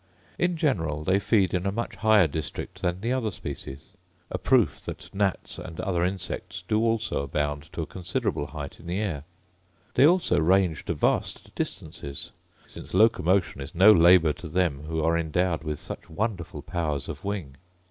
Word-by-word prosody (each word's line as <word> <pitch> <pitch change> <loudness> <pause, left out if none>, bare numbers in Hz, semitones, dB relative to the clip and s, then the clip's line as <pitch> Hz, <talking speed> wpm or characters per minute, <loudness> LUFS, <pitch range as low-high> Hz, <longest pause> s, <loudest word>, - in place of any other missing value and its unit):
In 175 -1 +1
general 80 - 0
they 95 +4 +3
feed 100 -2 +2
in 90 +1 0
a - - +1
much 115 -1 -4
higher 110 -1 +5
district 75 -2 -5
than 90 +1 -1
the 120 +3 0
other 125 -4 0
species; 75 -5 -7 0.4
a 90 - -2
proof 95 - +3
that - - -8
gnats 100 -2 -1
and 85 -3 -8
other 90 -3 0
insects 90 -1 -3
do 110 0 +2
also 115 -9 0
abound 75 +2 -2
to 85 - -2
a - - -4
considerable 90 -5 -2
height 75 -2 -7
in 85 - -12
the 90 +3 -1
air: 80 -10 -2 0.7
they 140 - +6
also 170 - +3
range 90 -1 +2
to - - -1
vast - - 0
distances; 70 -1 -5 0.3
since - - -9
locomotion 95 -8 +3
is 70 +4 -8
no 95 +5 +8
labour 85 -3 +6
to 85 - -9
them, 75 -4 0
who 80 -1 -1
are 80 +1 +3
endowed 85 +1 0
with 75 -1 -3
such - - -8
wonderful 95 0 -3
powers 80 -5 -2
of - - -7
wing. 95 -9 -4
90 Hz, 175 wpm, -26 LUFS, 80-100 Hz, 0.7 s, no